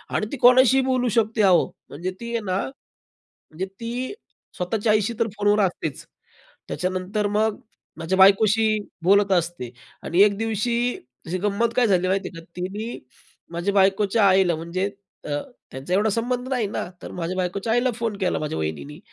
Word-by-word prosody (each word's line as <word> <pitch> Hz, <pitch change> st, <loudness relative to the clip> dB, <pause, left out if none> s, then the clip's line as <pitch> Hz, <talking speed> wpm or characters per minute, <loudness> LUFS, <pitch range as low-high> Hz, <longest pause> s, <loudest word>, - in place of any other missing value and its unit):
आणि -, -, +1 dB
ती 285 Hz, -, -4 dB
कोणाशीही 255 Hz, +2 st, +6 dB
बोलू 255 Hz, -1 st, +1 dB
शकते 220 Hz, -1 st, +2 dB
अहो. 175 Hz, -, +5 dB, 0.2 s
म्हणजे 175 Hz, +6 st, -4 dB
ती 235 Hz, 0 st, -6 dB
आहे 235 Hz, -, 0 dB
ना 185 Hz, 0 st, 0 dB
म्हणजे 190 Hz, -, -12 dB
ती 245 Hz, +6 st, -4 dB, 0.4 s
स्वतःच्या 210 Hz, +4 st, 0 dB
आईशी 215 Hz, +2 st, +1 dB
तर 230 Hz, -, +2 dB
फोनवर 205 Hz, +1 st, +3 dB
असतेच. 160 Hz, -5 st, -4 dB, 0.6 s
त्याच्यानंतर 185 Hz, +3 st, -2 dB
मग 215 Hz, +1 st, 0 dB, 0.4 s
माझ्या 175 Hz, +4 st, -1 dB
बायकोशी 215 Hz, +3 st, +5 dB, 0.4 s
बोलत 200 Hz, +1 st, +4 dB
असते 170 Hz, -8 st, -1 dB, 0.3 s
आणि 175 Hz, +3 st, +3 dB
एक 205 Hz, -1 st, +2 dB
दिवशी 225 Hz, +1 st, -1 dB, 0.5 s
अशी 180 Hz, +3 st, -2 dB
गंमत 210 Hz, +4 st, 0 dB
काय 250 Hz, -, +4 dB
झाली 185 Hz, -3 st, +2 dB
माहिती 195 Hz, 0 st, 0 dB
आहे 165 Hz, -, -8 dB
का. -, -, -16 dB
तिने 205 Hz, +6 st, -4 dB, 0.5 s
माझ्या 180 Hz, +4 st, -1 dB
बायकोच्या 200 Hz, +2 st, +3 dB
आईला 185 Hz, -3 st, +3 dB
म्हणजे 180 Hz, +5 st, -3 dB, 0.3 s
अ, -, -, -6 dB, 0.4 s
त्यांचा 135 Hz, +7 st, -7 dB
एवढा 210 Hz, +2 st, +2 dB
संबंध 245 Hz, +3 st, -2 dB
नाही 250 Hz, -5 st, 0 dB
ना, 200 Hz, -, -4 dB, 0.2 s
तर -, -, -8 dB
माझ्या 180 Hz, +1 st, -3 dB
बायकोच्या 195 Hz, +4 st, -2 dB
आईला 245 Hz, +2 st, +2 dB
फोन 230 Hz, -3 st, -3 dB
केला 185 Hz, -, 0 dB
माझ्या 150 Hz, -, -3 dB
वहिनींनी, 80 Hz, -3 st, -5 dB
200 Hz, 165 wpm, -23 LUFS, 180-225 Hz, 0.6 s, कोणाशीही